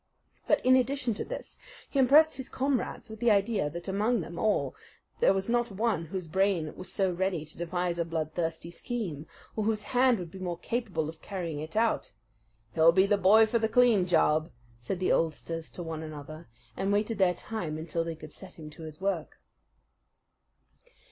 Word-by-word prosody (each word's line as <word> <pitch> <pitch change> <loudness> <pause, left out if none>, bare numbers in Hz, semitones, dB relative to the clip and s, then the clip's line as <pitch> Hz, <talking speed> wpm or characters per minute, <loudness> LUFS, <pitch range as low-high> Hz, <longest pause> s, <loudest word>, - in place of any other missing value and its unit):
But - - +2
in 255 0 +7
addition 260 -1 +1
to - - -4
this - - -8 0.3
he 280 - -1
impressed 295 +5 +6
his 265 -1 -6
comrades 270 -1 -1
with 220 -1 -9
the 240 0 +3
idea 200 -5 +2
that 170 +4 -8
among 210 +4 +1
them 170 +1 -7
all 175 -11 +1 0.4
there - - +5
was 195 0 -1
not 240 0 +1
one 200 -4 0
whose 180 +2 -5
brain 180 -2 +1
was 185 0 -6
so 190 -1 +1
ready 180 -3 -1
to - - -10
devise 175 0 -1
a 170 - +1
bloodthirsty 165 +1 -3
scheme, 175 - -4 0.3
or 215 - -1
whose 215 -1 0
hand 250 -1 +5
would 175 -3 -7
be 190 - -9
more 175 -2 -3
capable 200 -5 -2
of 160 0 -9
carrying 170 -6 -4
it 155 +4 -7
out. 225 - +1 0.6
"He'll 160 +1 +6
be 190 +3 +4
the 205 +1 +3
boy 210 +4 +7
for 230 +2 +1
the 220 0 +1
clean 230 -7 +4
job," 160 -2 +3 0.3
said 150 +10 -3
the 185 - +1
oldsters 165 0 -1
to 175 - -7
one 160 -1 -5
another, 155 0 -8 0.3
and 195 +1 -1
waited 210 +1 0
their 180 -2 +4
time 170 -9 -4
until 165 +1 -2
they 165 -1 -4
could 155 -1 -11
set 190 - -9
him 155 -2 -10
to 155 - -13
his 155 0 -9
work. 190 -5 -2
185 Hz, 190 wpm, -29 LUFS, 165-220 Hz, 0.6 s, in